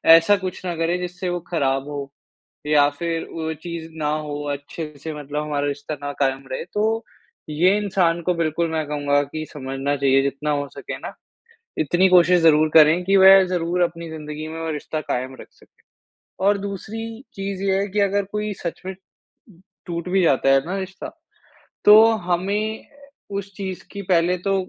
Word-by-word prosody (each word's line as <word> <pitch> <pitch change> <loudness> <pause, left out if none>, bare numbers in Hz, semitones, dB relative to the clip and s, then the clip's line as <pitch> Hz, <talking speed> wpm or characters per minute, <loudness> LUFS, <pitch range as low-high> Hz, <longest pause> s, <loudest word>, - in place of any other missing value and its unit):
ऐसा 165 +5 +5
कुछ 185 - -5
ना 175 -1 -2
करे 165 +2 0
जिससे 180 0 -4
वो 175 0 -2
ख़राब 135 -4 0
हो 140 -1 -6 0.6
या 150 -1 +5
फिर 165 -1 -2
वो 160 -1 -3
चीज़ 170 -2 -6
ना 150 -2 -1 0.2
हो 145 0 -4
अच्छे 145 +2 -6
से 160 - -4
मतलब 150 0 -4
हमारा 145 -1 -1
रिश्ता 145 +1 -4
ना 145 - -3
कायम 135 -1 0
रहे 130 - -3
तो, 220 +2 0 0.5
ये 175 +6 +3
इंसान 185 -5 +1
को 180 - +3
बिल्कुल 165 0 0
मैं 160 -1 -1
कहूँगा 145 -1 +1
की 155 +2 -6
समझना 135 0 -3
चाहिए 135 -1 +3
जितना 140 +2 -2
हो 145 -1 -1
सके - - -6
ना, - - -8 0.7
इतनी 175 +5 +3
कोशिश 180 0 +6
ज़रूर 155 -1 +5
करे 155 0 +7
कि 195 - +4
वह 190 0 +8
ज़रूर 180 0 -1
अपनी 170 -1 -1
ज़िन्दगी 155 -1 -7
में 160 +1 -6
वो 165 - -3
रिश्ता 155 +1 -4
कायम 130 -2 -3
रख - - -11
सके - - -26 0.6
और 205 0 +4
दूसरी 200 +2 -6 0.3
चीज़ 195 -1 -5
ये 195 -1 +2
है 200 - -1
की 205 +2 -1
अगर 200 +1 0
कोई 210 0 -2
सच 170 - -4
में 190 - -4 0.9
टूट 170 -1 -4
भी 190 +1 +2
जाता 135 -4 +3
है 135 0 +6
ना 185 +3 -3
रिश्ता, 190 0 -6 0.8
तो 215 +1 +9 0.2
हमें 205 +5 -1 0.5
उस 200 0 -7
चीज़ 190 -2 -5
की 200 - -6
पहले 175 +1 +3
तो 195 - +2
165 Hz, 180 wpm, -22 LUFS, 150-190 Hz, 0.9 s, तो